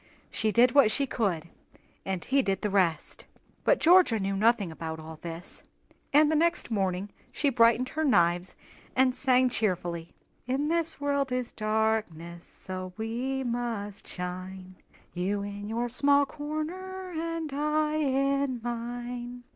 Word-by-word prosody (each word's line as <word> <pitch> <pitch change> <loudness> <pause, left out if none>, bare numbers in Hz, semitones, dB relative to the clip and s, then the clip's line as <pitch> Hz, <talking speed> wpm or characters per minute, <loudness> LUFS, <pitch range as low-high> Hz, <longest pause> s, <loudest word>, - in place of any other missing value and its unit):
She 220 -1 0
did 240 +3 +5
what 275 -4 +6
she 275 +6 +2
could, 185 -10 -1 0.6
and 190 -2 -3
he 275 +1 +3
did 195 -5 -2
the 210 - 0
rest." 180 -5 0 0.4
But - - +3
Georgia 335 -10 +5
knew 195 0 -1
nothing 210 -3 +2
about 160 0 -6
all 160 0 -9
this, 170 +1 -7 0.5
and 300 +1 +5
the - - +2
next 335 -4 +1
morning 195 -1 -1 0.2
she 285 -2 +1
brightened 235 +1 +4
her 315 - -2
knives 175 - +2 0.4
and 260 -1 +4
sang 255 0 +3
cheerily: 175 -7 -2 0.3
"In 275 +4 0
the 330 -1 +1
world 280 -2 0
is 250 -1 -2
darkness, 215 -6 -1
So 185 -1 -7
we 245 +4 -2
must 230 -5 -4
shine, 185 +1 -7 0.4
You 195 +3 -1
in 205 0 -6
your 235 +2 -1
small 280 +3 +4
corner, 355 +6 -5
And 330 -2 -3
I 300 +1 0
in 275 -2 +1
mine." 240 +1 -5
235 Hz, 140 wpm, -28 LUFS, 195-280 Hz, 0.6 s, what